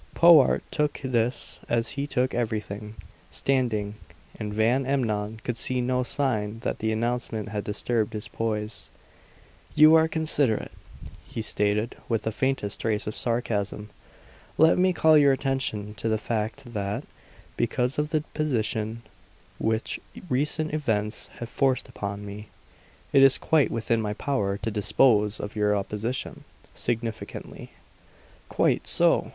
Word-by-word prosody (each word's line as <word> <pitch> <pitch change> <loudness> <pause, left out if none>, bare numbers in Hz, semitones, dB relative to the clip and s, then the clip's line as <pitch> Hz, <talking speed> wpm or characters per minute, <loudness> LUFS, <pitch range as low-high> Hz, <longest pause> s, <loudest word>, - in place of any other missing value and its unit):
Powart 165 -6 +6
took 150 -1 0
this 125 -1 0
as 115 -1 +1
he 140 +1 -3
took 130 -2 0
everything, 105 -2 -3 0.3
standing. 115 -7 0 0.5
And 105 -1 -4
Van 115 +5 +2
Emmon 110 -5 -1
could 120 -2 -3
see 130 0 0
no 125 +1 +1
sign 115 -5 -1
that - - -3
the 110 0 0
announcement 115 -1 -2
had 105 -1 -3
disturbed 110 +1 -1
his 105 -1 -5
poise. 110 -1 -3 0.9
"You 155 +1 +8
are 160 0 +6
considerate," 150 -8 +1 0.6
he 115 - -5
stated 105 +2 0
with 115 -2 0
the 110 - -1
faintest 130 -4 -1
trace 110 -1 0
of 105 - -4
sarcasm. 105 -3 -2 0.7
"Let 160 +3 +5
me 185 0 +4
call 160 -3 +5
your 140 -2 +5
attention 130 -7 -2
to 115 - -2
the 110 - +2
fact 115 +3 -4
that, 105 +4 -2 0.5
because 125 +3 0
of 150 0 0
the 155 -2 0
position 115 -6 -1 0.6
which 110 0 -1 0.3
recent 150 +4 0
events 110 -8 -1
have 120 - -5
forced 135 0 +1
upon 100 -4 -5
me, 105 +1 -8 0.7
it 135 - +7
is 135 -1 +7
quite 155 -3 +2
within 115 0 0
my 105 -1 -2
power 105 -9 -1
to 115 - -1
dispose 105 +1 +3
of 105 +1 -6
your 105 -1 +2
opposition" 105 +5 -3 0.3
significantly. 115 -2 -4 0.8
"Quite - - +1
so! - - +3
115 Hz, 135 wpm, -26 LUFS, 105-135 Hz, 0.9 s, You